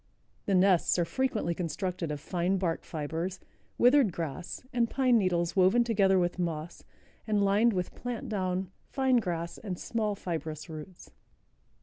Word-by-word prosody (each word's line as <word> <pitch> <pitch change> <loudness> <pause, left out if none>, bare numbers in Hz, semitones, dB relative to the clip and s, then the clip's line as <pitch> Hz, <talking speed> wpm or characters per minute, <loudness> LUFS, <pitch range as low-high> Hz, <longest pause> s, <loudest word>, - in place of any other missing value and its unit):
The 195 - +3
nests 185 -2 +4
are 175 - +2
frequently 215 -2 -1
constructed 175 0 -3
of 150 - -3
fine 180 +5 0
bark 175 -3 -1
fibers, 165 +4 -4 0.4
withered 250 -3 +5
grass 165 - -5
and 235 -1 +2
pine 255 -3 +3
needles 175 -3 0
woven 190 +6 +5
together 200 -5 +3
with 175 0 0
moss 165 -1 -3 0.4
and 210 -2 +2
lined 210 +4 +4
with 180 -2 -2
plant 245 -2 -5
down, 185 -2 -2 0.2
fine 265 -2 +2
grass 170 -5 -2
and 190 -5 -5
small, 215 0 -1
fibrous 160 -4 -5
roots. 160 +4 -10
185 Hz, 145 wpm, -29 LUFS, 170-215 Hz, 0.4 s, withered